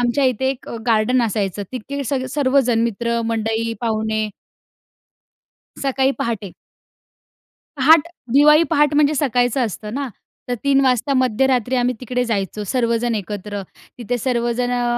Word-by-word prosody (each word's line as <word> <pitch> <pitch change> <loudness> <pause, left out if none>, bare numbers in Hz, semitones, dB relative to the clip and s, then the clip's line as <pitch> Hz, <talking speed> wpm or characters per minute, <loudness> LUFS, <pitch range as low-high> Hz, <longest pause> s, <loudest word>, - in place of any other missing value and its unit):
आमच्या 245 +3 +1
इथे 260 +1 +1
एक 270 - -8 0.2
गार्डन 230 +3 +3
असायचं, 205 -3 -1
तिथे 280 +3 -5
सगळे 260 0 -2
सर्वजण 260 -4 +2
मित्र 235 +1 -1
मंडळी 225 0 -1
पाहुणे 220 -1 -1 1.5
सकाळी 270 -1 +1
पहाटे. 210 -5 -3 1.2
पहाट 305 +4 +5 0.3
दिवाळी 300 +3 +6
पहाट, 295 0 +3
म्हणजे 295 0 +3
सकाळचं 250 -3 +1
असतं 210 +1 -7
ना, 275 0 -2 0.4
तर 245 - 0
3 275 -1 +4
वाजता 260 +1 +1
मध्यरात्री 255 0 +1
आम्ही 250 0 +1
तिकडे 250 0 -1
जायचो 210 -2 -2
सर्वजणं 235 0 0
एकत्र. 205 0 -5 0.4
तिथे 245 +1 -2
सर्वजण 240 0 -1
अ, 245 0 0
245 Hz, 130 wpm, -20 LUFS, 225-265 Hz, 1.5 s, दिवाळी